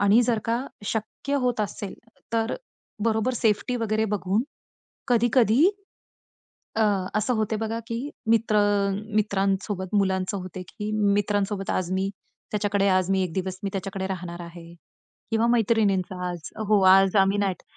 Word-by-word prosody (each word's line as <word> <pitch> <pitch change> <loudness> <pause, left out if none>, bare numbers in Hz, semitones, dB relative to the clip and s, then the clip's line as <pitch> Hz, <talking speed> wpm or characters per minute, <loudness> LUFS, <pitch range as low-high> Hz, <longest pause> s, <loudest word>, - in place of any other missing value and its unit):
आणि 205 +3 +5
जर 230 -2 +1
का 235 +3 0 0.2
शक्य 220 +6 -3
होत 245 -3 +1
असेल 205 -1 -4 0.4
तर 225 +1 +1 0.5
बरोबर 225 +2 +1
सेफ्टी 225 +2 +1
वगैरे 220 -2 0
बघून 195 +4 0 0.7
कधी-कधी, 240 +2 +4 1.1
अ, 225 - +3 0.3
असं 215 +4 +1
होते 220 -1 0
बघा 225 +1 -2
की 230 0 -2 0.3
मित्र 225 -1 +3
अ, 205 -1 +3 0.2
मित्रांसोबत 195 -2 0
मुलांचं 190 0 0
होते 185 0 -7
की 210 0 -5 0.2
मित्रांसोबत 205 -1 0
आज 185 -1 -1
मी 190 +1 0 0.4
त्याच्याकडे 205 -1 +1
आज 185 0 +2
मी 190 -1 +2
1 180 - -3
दिवस 190 0 -3
मी - - 0
त्याच्याकडे 195 0 -3
राहणार 175 -2 -5
आहे. 170 0 -11 0.6
किंवा 225 +1 +2
मैत्रिणींचा 215 -5 +2
आज 175 -2 -6 0.2
हो, 210 -2 +5
आज 190 +1 +6
आम्ही 195 +1 +4
नाईट 195 -3 -1
205 Hz, 140 wpm, -25 LUFS, 190-220 Hz, 1.1 s, आज